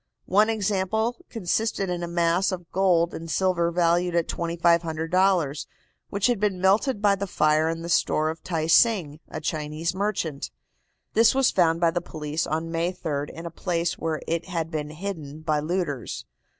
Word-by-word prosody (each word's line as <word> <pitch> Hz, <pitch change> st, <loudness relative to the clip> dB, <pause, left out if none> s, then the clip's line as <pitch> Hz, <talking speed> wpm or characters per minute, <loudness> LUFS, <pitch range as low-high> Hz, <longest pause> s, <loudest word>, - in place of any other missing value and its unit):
One 210 Hz, +4 st, +4 dB
example 220 Hz, +2 st, 0 dB
consisted 220 Hz, -1 st, -1 dB
in 175 Hz, -1 st, -2 dB
a 175 Hz, -, -3 dB
mass 170 Hz, +2 st, +1 dB
of 175 Hz, -3 st, -6 dB
gold 175 Hz, -3 st, +2 dB
and 165 Hz, 0 st, -7 dB
silver 175 Hz, -1 st, +1 dB
valued 175 Hz, 0 st, +1 dB
at 170 Hz, -1 st, +1 dB
$2,500, 170 Hz, -2 st, +1 dB, 0.4 s
which 200 Hz, 0 st, -1 dB
had 245 Hz, -4 st, +2 dB
been 200 Hz, -3 st, 0 dB
melted 205 Hz, +4 st, +2 dB
by 205 Hz, -1 st, +5 dB
the 200 Hz, 0 st, -3 dB
fire 155 Hz, -1 st, +2 dB
in 165 Hz, 0 st, -4 dB
the -, -, -5 dB
store 155 Hz, -2 st, +2 dB
of 160 Hz, -, -10 dB
Tai 165 Hz, -3 st, -2 dB
Sing, 165 Hz, -4 st, +3 dB
a -, -, -5 dB
Chinese 155 Hz, +1 st, -2 dB
merchant. 190 Hz, -7 st, -2 dB, 0.6 s
This 225 Hz, +2 st, +5 dB
was 270 Hz, -1 st, +4 dB
found 165 Hz, -2 st, +2 dB
by 170 Hz, -1 st, +4 dB
the 175 Hz, +1 st, -1 dB
police 155 Hz, 0 st, -3 dB
on 160 Hz, +2 st, -2 dB
May 165 Hz, +2 st, 0 dB
3d 145 Hz, -5 st, -3 dB
in 165 Hz, -, -9 dB
a 170 Hz, -, -5 dB
place 170 Hz, 0 st, -2 dB
where 160 Hz, -2 st, -2 dB
it 165 Hz, +1 st, -1 dB
had 165 Hz, -3 st, -3 dB
been 150 Hz, -2 st, -3 dB
hidden 155 Hz, -3 st, -6 dB
by 155 Hz, -1 st, 0 dB
looters. 155 Hz, -5 st, -3 dB
170 Hz, 175 wpm, -25 LUFS, 160-190 Hz, 0.6 s, by